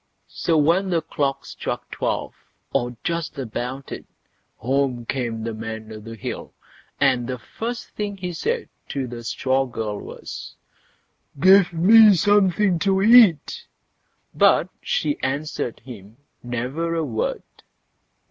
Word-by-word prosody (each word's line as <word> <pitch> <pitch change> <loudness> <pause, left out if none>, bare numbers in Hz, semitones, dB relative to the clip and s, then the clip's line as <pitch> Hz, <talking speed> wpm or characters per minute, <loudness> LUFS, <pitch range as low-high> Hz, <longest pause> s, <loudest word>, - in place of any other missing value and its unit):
So 165 -2 +1
when 170 +6 +3
the 170 -3 +1
clock 140 -3 -2
struck - - -5
twelve, - - -2 0.4
or 120 -3 -1
just 170 -3 -3
about 130 +1 -5
it, - - -7 0.5
home 130 -1 -1
came 115 -3 -3
the 115 0 -3
Man 110 0 -7
o' 110 - -8
the 115 +2 -9
Hill, 110 - -6 0.4
and 130 -4 +2
the 130 0 -3
first 230 - -6
thing 205 -1 -4
he 180 -2 -4
said 460 - -2 0.2
to 135 -2 -2
the 120 -1 -8
straw 130 +3 0
girl 110 -4 -4
was, - - -9 0.8
"Give 190 +1 +6
me 205 +5 +7
something 195 -1 +3
to 190 +1 +2
eat." 230 - +5 0.7
But - - +4
she 480 -12 -1
answered 140 -3 -3
him 110 -3 -12 0.2
never 130 +8 -3
a 165 - 0
word. 115 -5 -2
140 Hz, 130 wpm, -23 LUFS, 120-190 Hz, 0.8 s, me